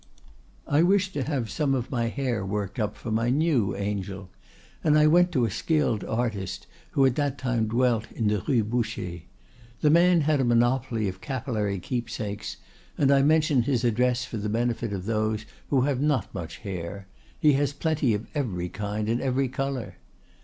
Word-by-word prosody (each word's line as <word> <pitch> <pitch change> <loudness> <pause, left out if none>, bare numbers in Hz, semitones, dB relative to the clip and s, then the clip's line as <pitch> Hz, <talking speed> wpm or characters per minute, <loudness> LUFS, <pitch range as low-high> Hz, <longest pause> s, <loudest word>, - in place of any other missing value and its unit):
"I 145 +2 +3
wished 190 +2 +3
to 145 - -2
have 130 -5 -2
some 140 -3 +1
of 125 +2 -3
my 120 -3 0
hair 120 -3 -2
worked 100 +2 -3
up 105 -1 -1
for 110 - -6
my 115 +2 +1
new 130 -8 +2
angel, 100 -2 -4 0.5
and 150 -1 +4
I 150 - +5
went 175 +3 +5
to 125 -6 +3
a 110 - -2
skilled 145 - 0
artist 110 -5 -2 0.3
who 135 - +4
at 130 - +4
that 145 -2 0
time 120 -4 0
dwelt 115 -1 +1
in 110 - -1
the 105 -2 +1
Rue 120 -6 +3
Boucher. 110 -6 -2 0.6
The 150 - +4
man 170 +1 +5
had 150 -1 +2
a - - +2
monopoly 120 -1 +2
of 95 0 -6
capillary 110 -6 -2
keepsakes, 110 0 -4 0.4
and 140 -1 +3
I 140 -1 +5
mention 155 -2 +3
his 125 0 0
address 125 +1 +2
for 115 - -6
the 105 0 -3
benefit 115 0 -1
of 95 -2 -4
those 110 0 -1 0.2
who 135 -3 +3
have 135 -1 0
not 145 -4 0
much 80 -2 -6
hair; 100 -1 -6 0.3
he 150 -1 +5
has 140 0 +1
plenty 145 -5 +1
of 105 - -5
every 95 - -2
kind 105 +1 -3
and 115 +2 0
every 130 0 0
color. 135 -2 -3
120 Hz, 180 wpm, -26 LUFS, 105-140 Hz, 0.6 s, I